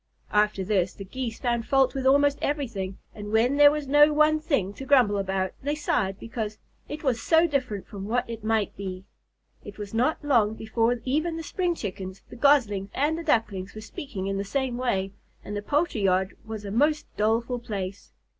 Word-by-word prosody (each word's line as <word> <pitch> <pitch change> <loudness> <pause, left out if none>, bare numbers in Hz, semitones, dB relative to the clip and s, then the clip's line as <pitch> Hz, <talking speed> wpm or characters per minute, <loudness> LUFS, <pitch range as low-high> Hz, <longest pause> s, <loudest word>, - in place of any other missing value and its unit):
After 210 -2 +2
this, 185 -2 0
the 195 - -8
Geese 235 +2 -5
found 235 -2 -1
fault 270 -1 +3
with 265 -1 -1
almost 285 +1 +4
everything, 225 -10 -2 0.2
and 210 0 -7
when 240 +5 +3
there 290 0 +9
was 295 -1 -3
no 295 +2 +6
one 305 +1 +4
thing 275 - 0
to 270 - -8
grumble 250 -8 +4
about, 190 -1 -1
they 290 +2 -1
sighed 195 -10 0
because, 220 -2 -5 0.3
"It 300 +2 -6
was 250 -5 +1
so 325 +1 +4
different 255 - -2
from 200 -2 -7
what 245 +3 0
it 230 -2 -7
might 220 -2 0
be." 190 -1 -6 0.6
It 205 - -10
was 205 -1 -7
not 255 +6 0
long 225 -7 +3
before 230 +2 0
even 310 +5 0
the 325 - -5
spring 350 +3 -1
Chickens, 190 - -6
the - - -8
Goslings, 235 -8 +3
and 295 +4 +1
the 335 - -5
Ducklings 215 - 0
were 215 - -7
speaking 220 -3 -6
in 195 0 -2
the - - -1
same 255 +4 -2
way, 195 -6 -1 0.3
and 205 - -5
the 205 - -2
poultry 290 0 0
yard 190 0 +1
was 220 -2 -7
a 200 - -5
most 295 +7 +2
doleful 230 +3 +1
place. 200 -5 -6
230 Hz, 195 wpm, -26 LUFS, 200-280 Hz, 0.6 s, there